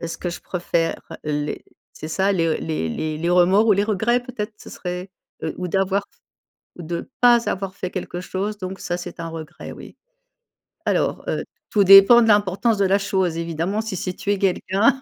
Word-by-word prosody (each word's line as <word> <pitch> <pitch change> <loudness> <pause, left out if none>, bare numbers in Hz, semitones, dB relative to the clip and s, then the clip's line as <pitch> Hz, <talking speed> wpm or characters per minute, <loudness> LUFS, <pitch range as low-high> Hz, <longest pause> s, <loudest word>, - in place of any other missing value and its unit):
est-ce 165 0 -5
que 175 - -3
je 170 - -7
préfère 170 -2 -1 0.2
les 150 0 -3 0.3
c'est 155 - -8
ça, 190 +4 +1
les 165 -3 +1
les 155 - -2
les 155 - -3
les 170 +2 -1
remords 185 +5 +4
ou 215 - +6
les 200 0 +2
regrets, 220 +4 +1
peut-être? 225 -4 -5
Ce - - -13
serait, 180 +1 -6 0.3
heu, - - -2
ou 180 - -3
d'avoir 195 +2 +1 0.7
ou 175 - -9
de 170 +8 -5
pas 240 -1 +5
avoir 195 -1 -3
fait 185 - -4
quelque 180 -1 -5
chose, 200 +3 -3
donc 185 0 -6
ça 175 0 -3
c'est 175 - -8
un 165 0 -4
regret, 160 -1 -8
oui. - - -11 0.9
Alors, - - 0
heu, - - -1 0.3
tout 205 - +3
dépend 195 +5 +9
de 225 - +2
l'importance 205 +2 +2
de 200 - +3
la 195 +1 +3
chose. 190 -4 0
Evidemment 170 +5 -2
si 220 -3 -4
c'est 185 +1 -3
tuer 205 +1 -1
quelqu'un, 200 +7 +2
190 Hz, 190 wpm, -22 LUFS, 170-205 Hz, 0.9 s, dépend